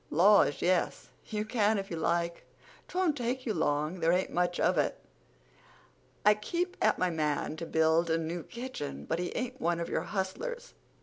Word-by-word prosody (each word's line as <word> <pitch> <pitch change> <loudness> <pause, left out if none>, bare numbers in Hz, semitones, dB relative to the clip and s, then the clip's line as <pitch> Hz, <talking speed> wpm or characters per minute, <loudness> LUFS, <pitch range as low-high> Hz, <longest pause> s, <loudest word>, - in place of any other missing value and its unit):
"Laws, 190 -2 +5
yes, 180 0 +1 0.2
you 210 -1 -2
can 215 -1 +2
if 195 -1 -4
you - - -2
like. 170 +1 -1 0.4
'Twon't 360 -4 +1
take 255 0 -2
you 225 - 0
long—there 155 +2 +1
ain't 180 +2 +1
much 175 0 0
of - - +3
it. - - 0 1.3
I 210 - +8
keep 345 - -3
at - - +3
my 185 -1 +1
man 155 -1 -1
to 165 - -5
build 160 +1 +3
a 160 - +3
new 165 +1 -3
kitchen, 235 - -6
but 165 - -1
he 180 - -2
ain't 255 +1 -4
one 170 0 +1
of 170 - -3
your - - 0
hustlers. 475 - -4
180 Hz, 175 wpm, -30 LUFS, 165-235 Hz, 1.3 s, I